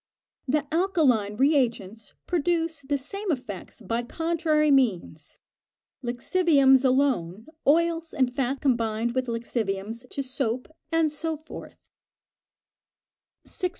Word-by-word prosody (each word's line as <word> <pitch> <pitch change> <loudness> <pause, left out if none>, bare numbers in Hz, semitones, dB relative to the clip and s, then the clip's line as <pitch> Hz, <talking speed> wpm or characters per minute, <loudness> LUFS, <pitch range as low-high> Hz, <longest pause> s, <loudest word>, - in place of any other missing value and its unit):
The 290 +2 +1
alkaline 300 - +2
re 280 +5 +4
agents 225 -5 -2
produce 330 -2 0
the 285 +1 -1
same 395 +8 -5
effects 240 - -6
by 230 +3 -2
contrary 310 +2 +1
means 195 - 0 0.7
lixiviums 270 +1 +3
alone, 250 -8 +1 0.2
oils 330 +2 +2
and 255 -2 0
fat 270 0 -1
combined 235 -3 0
with 255 0 -1
lixiviums 230 0 -3
to 275 - -3
soap, 255 -2 -2 0.2
and 325 -2 +2
so 320 +1 -3
forth. 315 +2 -11 1.7
601. 365 - -2
265 Hz, 110 wpm, -26 LUFS, 230-315 Hz, 1.7 s, re